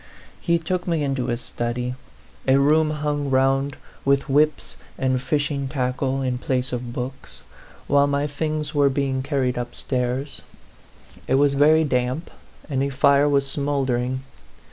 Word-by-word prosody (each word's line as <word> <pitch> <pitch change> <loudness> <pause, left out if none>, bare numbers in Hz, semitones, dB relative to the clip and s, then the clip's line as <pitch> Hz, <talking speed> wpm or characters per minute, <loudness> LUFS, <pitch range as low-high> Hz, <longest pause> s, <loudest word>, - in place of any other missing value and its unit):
He 170 -1 +2
took 175 +2 -3
me 165 -3 +1
into 135 -3 -1
his 120 -1 -2
study, 125 +1 -3 0.5
a 135 +1 +5
room 155 +3 +4
hung 150 -1 -2
round 135 +1 +2 0.3
with 140 +1 +2
whips 150 +2 +1 0.2
and 130 -1 0
fishing 145 0 -1
tackle 130 0 -1
in 125 -1 -1
place 130 0 -1
of 120 -1 -4
books, 130 +2 -7 0.4
while 140 0 +4
my 140 0 0
things 150 +1 -3
were 145 -2 +4
being 135 -1 -1
carried 130 -3 -1
upstairs. 125 +2 -3 0.9
It 130 - +2
was 140 +1 +4
very 155 +3 +5
damp, 130 +2 -1 0.4
and 135 -3 -1
a 140 - 0
fire 140 +2 +4
was 140 -1 +2
smouldering. 130 -3 0
140 Hz, 145 wpm, -23 LUFS, 130-145 Hz, 0.9 s, a